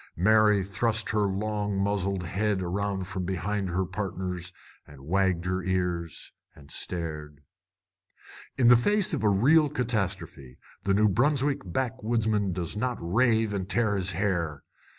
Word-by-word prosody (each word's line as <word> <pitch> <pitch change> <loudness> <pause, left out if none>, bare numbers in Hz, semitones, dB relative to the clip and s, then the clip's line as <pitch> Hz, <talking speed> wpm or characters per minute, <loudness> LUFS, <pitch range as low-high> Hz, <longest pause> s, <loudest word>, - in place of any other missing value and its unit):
Mary 105 +2 +4
thrust 110 +3 -1
her 105 -1 +2
long 105 0 -2
muzzled 100 -1 -1
head 95 +2 -1
around 95 +1 -2
from 95 -2 -4
behind 95 +2 -2
her 90 +2 0
partners, 90 -2 -4 0.4
and 75 -3 -14
wagged 95 0 +1
her 95 +1 -1
ears, 90 -3 -2 0.2
and 70 -1 -16
stared. 75 -4 -5 1.2
In 125 - +4
the 125 - +9
face 205 - +2
of 140 - -1
real 135 +10 +4
catastrophe 110 - -3 0.3
the 100 0 +2
New 105 +1 +4
Brunswick 135 +6 +2
backwoodsman 110 -1 -1
does 85 0 -3
not 125 +3 -1
rave 110 +4 +2
and 95 -1 -3
tear 110 -3 +1
his 95 -1 -1
hair. 85 -6 -1
100 Hz, 135 wpm, -27 LUFS, 90-110 Hz, 1.2 s, the